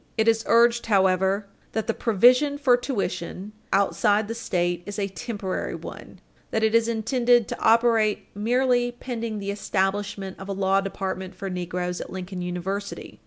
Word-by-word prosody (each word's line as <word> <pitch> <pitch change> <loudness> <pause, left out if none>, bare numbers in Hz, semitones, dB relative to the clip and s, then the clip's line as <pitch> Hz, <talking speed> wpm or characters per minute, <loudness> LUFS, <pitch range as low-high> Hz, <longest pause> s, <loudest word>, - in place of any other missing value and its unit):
It 220 0 +2
is 225 0 +3
urged, 235 0 +4
however, 190 0 +2 0.3
that 220 - -1
the - - 0
provision 250 +7 +4
for 270 -4 +4
tuition 200 -6 -4 0.2
outside 205 +2 +2
the 230 - -3
State 175 -6 -1
is 205 0 -5
a 200 -1 0
temporary 200 -2 -4
one - - -10 0.3
that 220 - -1
it 220 0 +2
is 230 0 +4
intended 235 +1 +2
to - - -5
operate 225 -2 +3
merely 245 +3 +1
pending 230 -3 -5
the 200 -1 -3
establishment 195 -1 -2
of 190 +1 -8
a - - -1
law 195 0 +2
department 190 -1 -4
for 195 +1 -5
negroes 180 0 -3
at - - -8
Lincoln 185 0 -6
University. 180 +3 -5
205 Hz, 160 wpm, -25 LUFS, 190-230 Hz, 0.3 s, urged